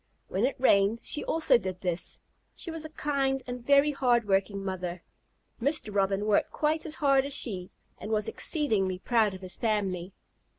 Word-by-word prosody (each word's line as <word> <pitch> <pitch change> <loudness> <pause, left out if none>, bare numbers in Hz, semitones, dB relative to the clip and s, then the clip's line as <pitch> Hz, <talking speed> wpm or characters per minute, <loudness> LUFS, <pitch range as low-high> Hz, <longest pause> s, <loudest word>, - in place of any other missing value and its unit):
When 195 +5 +1
it 270 - -1
rained 210 -2 +3
she 295 - -1
also 315 -6 +3
did 185 -3 -5
this. 175 -2 -2 0.3
She 335 - -5
was 325 -1 -4
a 315 - -6
kind 275 -3 -1
and 245 -1 -6
very 280 +3 +4
hard 245 -5 +2
working 195 0 0
mother. 180 -2 -4 0.6
Mr. 280 -5 0
Robin 195 0 +1
worked 210 -1 +2
quite 310 +1 -1
as 310 - -2
hard 275 -2 +3
as 280 +1 -4
she, 190 -9 0 0.3
and - - -7
was 215 -1 +1
exceedingly 215 - 0
proud 215 -1 +1
of 185 - -11
his 185 -1 -6
family. 195 -5 -1
220 Hz, 175 wpm, -28 LUFS, 195-280 Hz, 0.6 s, very